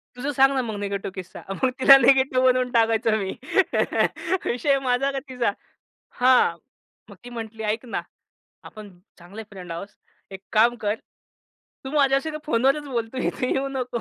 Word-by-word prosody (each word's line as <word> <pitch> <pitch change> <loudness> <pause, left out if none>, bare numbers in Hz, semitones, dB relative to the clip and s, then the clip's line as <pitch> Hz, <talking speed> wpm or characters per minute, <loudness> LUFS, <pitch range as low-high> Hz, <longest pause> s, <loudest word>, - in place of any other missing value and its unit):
"तुझं 270 +4 -3
सांग 270 +1 +5
ना, 265 - +1
मग 225 -4 -5
निगेटिव्ह 200 -1 -4
किस्सा." 185 -2 -9
मग 195 +7 0
तिला 275 +1 +9
निगेटिव्ह 265 0 +3
बनवून 255 -1 +2
टाकायचो 225 -2 +2
मी. 195 -3 -3 1.1
विषय 275 +3 +1
माझा 255 +2 +1
का 275 - -3
तिचा. 250 -5 -1 0.7
हां, 255 0 +4 0.5
मग - - -12
ती 245 - -9
म्हटली 225 -2 -7
"ऐक 225 +3 -8
ना, 230 - -3 0.6
आपण 210 -2 -11 0.3
चांगले 195 +6 -10
फ्रेंड 180 -3 -9
आहोत. 170 +4 -6 0.4
एक 190 -1 -9
काम 230 +3 +4
कर, 205 - +1 0.9
तू 265 - -6
माझ्याशी 275 0 +2
ना, 305 - -5
फोनवरच 275 +2 +1
बोल, 235 -4 -3
इथे 255 - -2
येऊ 270 +1 -1
नको." 250 -3 -3
245 Hz, 160 wpm, -23 LUFS, 220-265 Hz, 1.1 s, तिला